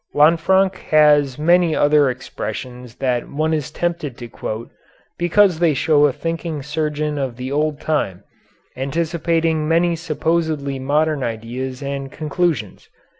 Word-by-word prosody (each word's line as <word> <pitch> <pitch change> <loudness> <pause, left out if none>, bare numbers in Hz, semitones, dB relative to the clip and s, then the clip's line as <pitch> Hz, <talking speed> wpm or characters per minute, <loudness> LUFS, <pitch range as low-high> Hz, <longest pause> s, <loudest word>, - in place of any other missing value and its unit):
Lanfranc 170 +5 +4
has 150 -3 +4
many 170 +1 +3
other 145 -1 +4
expressions 125 -1 -6
that 125 -3 -1
one 155 +2 -1
is 150 -4 -2
tempted 170 -7 -3
to 120 - -8
quote, 110 0 -6 0.5
because 175 0 +3
they 165 -4 +3
show 150 +1 +4
a - - 0
thinking 165 +1 -4
surgeon 150 0 -2
of 130 -4 -3
the 130 +1 -5
old 150 +1 0
time, 100 - -2 0.5
anticipating 160 +3 0
many 170 +1 +2
supposedly 160 -3 -1
modern 150 +2 +1
ideas 125 +4 -4
and 140 0 -4
conclusions. 155 - -2
150 Hz, 125 wpm, -20 LUFS, 135-165 Hz, 0.5 s, Lanfranc